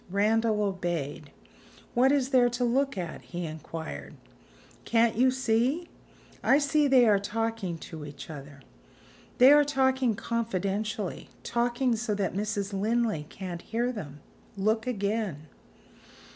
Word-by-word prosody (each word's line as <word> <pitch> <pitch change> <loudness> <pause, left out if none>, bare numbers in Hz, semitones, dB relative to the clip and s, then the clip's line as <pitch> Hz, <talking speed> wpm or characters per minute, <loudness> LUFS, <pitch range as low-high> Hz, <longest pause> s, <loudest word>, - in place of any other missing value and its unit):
Randal 215 +2 +2
obeyed. 175 -7 -3 0.6
"What 255 +3 +4
is 275 -2 +2
there 250 -3 +4
to 240 +1 -2
look 265 0 +1
at?" 175 -3 -5
he 175 0 -6
inquired. 155 - -7 0.7
"Can't 230 0 +2
you 255 +3 +4
see?" 260 +6 0 0.5
"I 275 - +5
see 290 0 +2
they 260 -3 +6
are 205 -2 +5
talking 225 -3 -2
to 160 -1 -9
each 140 -1 -9
other." 145 -2 -10 0.8
"They 255 +3 +8
are 295 0 +7
talking 265 -4 +1
confidentially; 210 -3 -2
talking 240 +1 +1
so 220 -1 -2
that 195 -3 -1
Mrs. 205 0 -2
Linley 210 -5 0
can't 180 -3 -6
hear 235 +3 -1
them. 150 - -8 0.4
Look 220 +4 +1
again." 205 - -2
220 Hz, 130 wpm, -28 LUFS, 185-245 Hz, 0.8 s, They